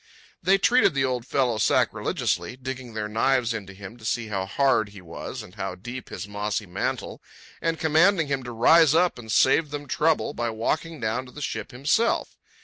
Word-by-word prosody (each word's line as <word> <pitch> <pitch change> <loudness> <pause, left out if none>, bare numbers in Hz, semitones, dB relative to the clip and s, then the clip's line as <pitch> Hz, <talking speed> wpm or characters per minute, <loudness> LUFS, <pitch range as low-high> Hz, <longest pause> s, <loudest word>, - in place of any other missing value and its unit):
They 190 +2 +4
treated 200 - +4
the 135 -1 +2
old 125 -2 -2
fellow 125 -5 +1
sacrilegiously, 125 - 0
digging 130 -2 -7
their 105 -1 -2
knives 120 +2 +1
into 100 -4 -6
him 100 +3 -10
to 115 - -17
see 115 0 -2
how 95 -2 -2
hard 110 -1 +2
he 100 -1 -12
was 85 -2 -7
and 90 - -14
how 95 -3 -4
deep 120 +8 -8
his 100 - -6
mossy 105 +1 -3
mantle, 90 - -4 0.4
and 165 -1 0
commanding 165 +3 +4
him 140 -1 -2
to 120 - -5
rise 155 +6 +5
up 175 -5 +2
and 110 -2 -8
save 145 +7 +4
them 145 0 -6
trouble 150 +1 +1
by 120 -3 -2
walking 150 +8 -2
down 120 +3 -2
to - - -13
the 150 - -10
ship 110 -6 -4
himself. 145 - 0
125 Hz, 190 wpm, -25 LUFS, 110-150 Hz, 0.4 s, rise